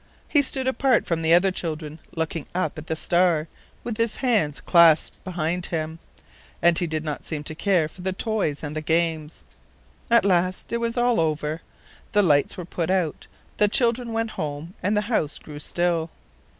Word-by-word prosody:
He 290 - +4
stood 265 -1 -1
apart 260 -2 +2
from 165 -1 -1
the 160 0 +2
other 180 +3 +5
children, 155 -3 -5 0.2
looking 160 -2 -3
up 185 - -1
at 155 - -11
the 160 - -1
star, 170 -1 +2 0.4
with 230 -3 -4
his 230 -1 +1
hands 210 - +1
clasped 170 -3 +4
behind 175 -1 -2
him, 160 -1 -3 0.6
and 170 0 +4
he 175 - -1
did 155 -1 -3
not 150 -2 -4
seem 150 -2 -4
to 155 - -5
care 175 -1 +1
for 180 - -14
the 190 +1 -1
toys 190 -7 -2
and 150 0 -5
the 155 - -2
games. 160 -1 -1 0.7
At 235 -4 +5
last 185 +2 +1
it - - +2
was 235 +1 -2
all 240 -3 +3
over. 155 0 -1 0.5
The 205 - +5
lights 145 +1 +2
were 180 - -5
put 170 -1 -3
out, 185 -5 -1 0.3
the 210 - +4
children 235 +2 +1
went 225 0 -1
home, 150 +1 -5
and 205 +3 +1
the - - +3
house 210 -9 -1
grew 150 -1 -10
still. 170 0 0
170 Hz, 185 wpm, -24 LUFS, 155-210 Hz, 0.7 s, other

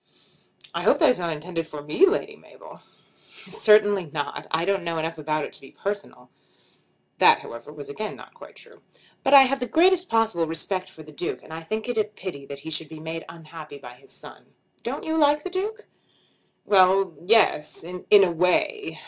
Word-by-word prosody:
"I - - -2
hope - - +4
that 315 - +5
is 250 - -2
not 170 -1 -2
intended 165 +1 -4
for 150 -2 -8
me, 150 - +4
Lady 400 - -1
Mabel." - - -16 0.7
"Certainly 205 -3 +4
not. 145 -1 -5
I 160 +1 0
don't 195 -1 0
know 170 -1 -3
enough 160 0 -3
about 155 0 -1
it - - -11
to - - -12
be 135 - -13
personal." 200 - -6 0.9
That, - - +6
however, 115 +5 -10
was 150 -1 -10
again 215 +9 -5
not - - -14
quite - - -14
true. - - -16 0.4
"But 275 - +5
I 275 - +11
have 270 +1 0
the 250 - -3
greatest 360 +4 +3
possible 220 -8 +1
respect 185 +4 -3
for 155 - -13
the 155 - -14
Duke, 160 +4 -5
and - - -12
I 160 - -6
think 215 +7 -4
it 245 -2 -1
a - - +4
pity 185 -9 -8
that 140 - -7
he 160 - -6
should 155 0 -4
be 160 -1 -10
made 160 +1 -6
unhappy 160 -3 -11
by 120 -3 -11
his 125 - -19
son. - - -14 0.3
Don't - - -5
you 320 0 -2
like 295 -1 +3
the 370 - -5
Duke?" 425 +4 -4 0.8
"Well; 190 -2 +4
yes; 185 -7 +2
in 180 +2 -9 0.2
a 180 - +2
way. 180 - 0
180 Hz, 200 wpm, -24 LUFS, 155-225 Hz, 0.9 s, I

